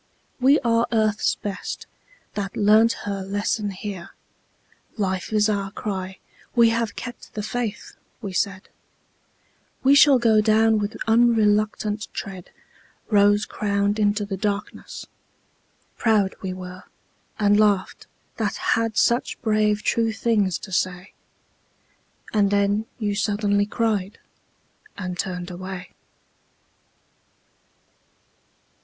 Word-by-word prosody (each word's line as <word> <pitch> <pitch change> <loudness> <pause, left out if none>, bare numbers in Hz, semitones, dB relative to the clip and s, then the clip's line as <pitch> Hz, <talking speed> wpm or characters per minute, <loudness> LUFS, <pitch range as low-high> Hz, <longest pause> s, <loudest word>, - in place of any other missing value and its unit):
"We 270 +4 +5
are 230 0 +2
Earth's 215 -2 +1
best, 205 -1 -5 0.5
that 195 -2 -4
learnt 215 +3 +5
her 200 -1 -3
lesson 205 +2 -1
here. 190 -2 -6 0.9
Life 190 -2 -2
is 210 -1 +3
our 200 -2 -1
cry. 190 -2 -5 0.4
We 235 -1 +6
have 225 -2 -1
kept 240 -1 -9
the 210 - -3
faith!" 225 -1 -4 0.2
we 200 -5 -6
said; 195 +1 -1 1.2
"We 270 +1 +6
shall 280 -1 +7
go 225 -3 +4
down 220 0 +4
with 205 +1 -3
unreluctant 215 -2 +2
tread 190 -3 -6 0.6
Rose 205 0 +4
crowned 200 0 -1
into 205 0 +1
the 195 -1 -4
darkness!"... 205 +1 -4 0.9
Proud 210 -4 +2
we 190 - -3
were, 185 0 -8 0.5
And 205 -1 +3
laughed, 205 -3 +1 0.3
that - - -1 0.2
had 225 -1 -1
such 235 +1 +2
brave 215 -1 +2
true 230 -1 +1
things 210 -6 +1
to 195 - -13
say. 180 +1 -2 1.2
And 205 -2 +3
then 205 +2 +1
you 210 -4 -1
suddenly 205 0 +1
cried, 210 -3 -1 0.8
and 185 -2 -4
turned 180 -1 -3
away. 185 0 -7
205 Hz, 110 wpm, -23 LUFS, 195-220 Hz, 1.2 s, shall